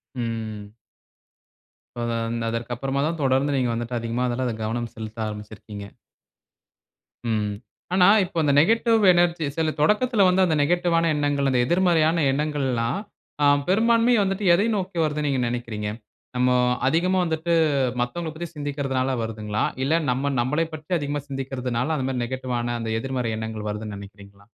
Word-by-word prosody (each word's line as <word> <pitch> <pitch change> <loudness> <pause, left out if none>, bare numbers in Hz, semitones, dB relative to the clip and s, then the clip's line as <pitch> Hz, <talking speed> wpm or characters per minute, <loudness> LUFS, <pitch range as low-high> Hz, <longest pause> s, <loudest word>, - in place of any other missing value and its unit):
ம். 110 -3 -5 1.2
இப்போ 120 - -3 0.2
அந்த 115 0 -3
அதற்கு 115 +1 -3
அப்புறமா 135 +3 -2
தான் 165 +1 -1
தொடர்ந்து 135 +1 +2
நீங்க 125 -2 +1
வந்துட்டு 120 +1 -3
அதிகமா 115 +2 -2
அதுல 120 0 -1
கவனம் 115 +1 -3
செலுத்த 110 0 -5
ஆரம்பிச்சுருக்கீங்க. 105 -1 -8 1.4
ம். 105 -2 0 0.4
ஆனா 180 -1 +5 0.2
இப்போ 170 - -9
அந்த 145 - +3
நெகட்டிவ் 225 +6 +3
எனர்ஜி 175 -2 +2
சில 160 -1 +1
தொடக்கத்துல 210 +6 +3
வந்து 185 +1 +4
அந்த 160 -3 +1
நெகட்டிவ்வான 170 +1 +2
எண்ணங்கள் 145 -2 +1
அந்த 125 - +2
எதிர்மறையான 170 0 +3
எண்ணங்கள்லாம், 135 -2 -1 0.4
அ - - +5 0.2
பெரும்பான்மையா 230 +3 +4
வந்துட்டு 195 +1 -2
எதை 200 +6 +3
நோக்கி 185 -3 -3
வருதுன்னு 150 -1 -1
நீங்க 130 -2 0
நெனைக்கிறீங்க? 115 -3 -3 0.5
நம்மோ 125 0 +3 0.3
அதிகமா 180 +6 +2
வந்துட்டு 165 +1 -1 0.5
மத்தவங்களப் 160 +6 -3
பத்தி 170 +1 -4
சிந்திக்கிறதனால 135 -3 -1
வருதுங்களா? 105 -1 -3 0.2
இல்ல 155 - +1 0.2
நம்ம 135 +3 -1
நம்மளை 150 +7 0
பற்றி 155 +4 -13
அதிகமா 145 0 -3
சிந்திக்கிறதனால 130 +1 -2
அந்த 130 - -2
மாதிரி 125 -2 -1
நெகட்டிவ்வான 120 -1 -3
அந்த 110 -1 -3
எதிர்மறை 125 -3 -2
எண்ணங்கள் 110 -1 -5
வருதுன்னு 105 0 -5
நெனைக்கிறீங்களா? 100 0 -13
135 Hz, 140 wpm, -24 LUFS, 115-165 Hz, 1.4 s, ஆனா